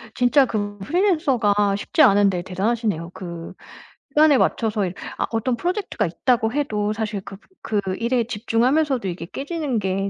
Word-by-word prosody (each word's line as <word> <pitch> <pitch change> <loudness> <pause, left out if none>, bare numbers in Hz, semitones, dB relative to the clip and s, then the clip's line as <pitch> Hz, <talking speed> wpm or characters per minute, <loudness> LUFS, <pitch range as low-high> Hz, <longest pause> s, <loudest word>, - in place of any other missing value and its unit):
진짜 260 +2 +4
그 205 -3 -3
프리랜서가 255 - +2
쉽지 205 +10 0
않은데 200 -6 +4
대단하시네요. 195 -2 -1
그 170 -2 -8 0.6
시간에 300 0 +5
맞춰서 215 -5 +1
이 180 - -6 0.2
아 - - 0
어떤 230 +2 0
프로젝트가 360 - -2
있다고 225 +6 +1
해도 215 -8 -1
사실 215 -2 -3
그 195 - -10 0.2
그 210 -2 -1 0.2
일에 235 +1 +1
집중하면서도 245 +3 +1
이게 170 -1 -6
깨지는 285 - -3
게 195 0 -1
225 Hz, 345 characters per minute, -22 LUFS, 200-265 Hz, 0.6 s, 시간에